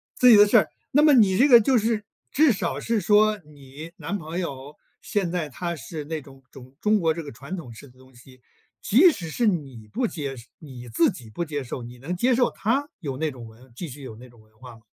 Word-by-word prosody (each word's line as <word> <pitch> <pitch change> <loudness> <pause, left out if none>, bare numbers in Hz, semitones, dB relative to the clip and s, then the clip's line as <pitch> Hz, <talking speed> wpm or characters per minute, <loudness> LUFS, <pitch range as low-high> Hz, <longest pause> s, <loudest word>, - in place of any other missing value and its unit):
自 250 - +5
己 220 - +9
的 205 - +7
事， 210 0 +5 0.3
那 290 - +4
么 305 0 +6
你 205 -7 +4
这 260 - +5
个 240 -3 +9
就 250 +3 +2
是， 220 -1 -1 0.3
至 300 -3 +4
少 195 - -3
是 230 -2 -1
说 210 +2 +3
你 150 0 -12
男 205 - -4
朋 165 0 -6
友， 140 -4 -6 0.3
现 195 -4 -2
在 170 -3 -3
他 170 +5 -4
是 150 +2 -8
那 155 0 -4
种 135 -1 -16
中 130 0 -14
中 215 +2 +2
国 165 -5 +1
这 165 - -6
个 150 - -9
传 140 +10 -8
统 125 -9 -9
式 135 +5 -13
的 125 +1 -23
东 130 0 -20
西， 130 +1 -18 0.4
即 290 - +5
使 175 - -7
是 230 +8 0
你 135 - -3
不 245 +2 -1
接 140 - -6
受 120 - -13
你 125 -5 -11
自 120 - +2
己 125 - -12
不 140 +11 -4
接 150 -3 -4
受， 125 -1 -7
你 120 +1 -11
能 150 +9 -5
接 245 +8 +2
受 245 0 +2
他 270 +7 -1
有 140 -5 -5
那 160 +2 -1
种 125 -3 -11
文 120 +4 -18
继 165 +5 -6
续 140 +2 -11
有 130 -5 -9
那 125 +3 -14
种 120 -1 -21
文 110 0 -28
化 125 -3 -12
吗？ - - -22
160 Hz, 265 characters per minute, -24 LUFS, 130-210 Hz, 0.4 s, 己